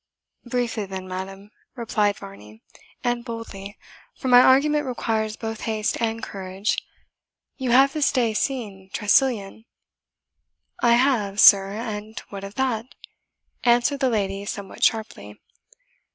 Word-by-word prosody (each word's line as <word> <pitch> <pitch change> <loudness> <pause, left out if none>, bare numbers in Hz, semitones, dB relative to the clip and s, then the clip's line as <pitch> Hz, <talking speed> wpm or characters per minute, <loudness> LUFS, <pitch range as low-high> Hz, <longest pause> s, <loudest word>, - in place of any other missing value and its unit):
"Briefly 240 -4 -2
then, 190 -1 -6
madam," 195 +2 -7 0.2
replied 215 -4 0
Varney, 110 - -13 0.4
"and 240 -1 -1
boldly, 225 -4 -8 0.4
for 260 - -3
my 245 0 +8
argument 295 +3 +4
requires 220 -3 -2
both 225 -1 -6
haste 215 -1 -1
and 225 0 -1
courage 190 +1 -3 0.8
you 260 -2 -3
have 270 +3 +5
this 300 -2 +2
day 235 -4 +1
seen 210 -6 -3
Tressilian?" 220 -1 +1 1.2
"I 235 -1 +5
have, 235 -6 +2
sir 195 -2 +7
and 215 0 -5
what 200 -1 -8
of 200 +1 -8
that?" 250 -4 -1 0.8
answered 245 +3 +3
the 265 -2 +2
lady 200 -3 -1
somewhat 200 -1 -6
sharply. 220 -1 -1
220 Hz, 125 wpm, -23 LUFS, 200-245 Hz, 1.2 s, my